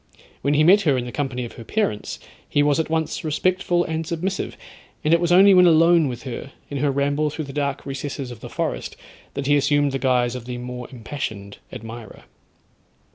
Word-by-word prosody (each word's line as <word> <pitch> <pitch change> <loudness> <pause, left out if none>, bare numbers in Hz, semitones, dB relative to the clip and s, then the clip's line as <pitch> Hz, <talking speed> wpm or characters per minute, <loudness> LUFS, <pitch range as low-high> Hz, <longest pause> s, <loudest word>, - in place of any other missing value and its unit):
When 145 +1 +1
he 150 - +4
met 195 +6 +6
her 145 -8 +2
in 125 - -2
the 120 - -6
company 130 -4 -3
of 115 - -8
her 115 - -10
parents, 115 - -2 0.3
he 145 - +3
was 145 +1 +2
at 160 - -1
once 160 -1 -1
respectful 175 +3 +1
and 160 -1 -2
submissive, 175 +4 -3 0.5
and 155 - +3
it 170 - +5
was 175 0 +1
only 195 +3 +8
when 180 -1 +7
alone 165 -1 +5
with 120 -2 -5
her, 135 +1 -6 0.2
in 140 - -2
her 145 +1 +2
ramble 140 +2 +1
through 155 +1 -5
the 135 - -9
dark 140 -1 -2
recesses 135 -1 -5
of 120 - -9
the - - -9
forest, - - -3 0.4
that 140 - -3
he 145 +1 +4
assumed 145 0 +2
the 135 - -2
guise 125 -2 +2
of 125 -2 -7
the 125 0 -5
more 125 0 -6
impassioned 110 -5 -6
admirer. 115 -2 -9
145 Hz, 205 wpm, -23 LUFS, 125-160 Hz, 0.5 s, only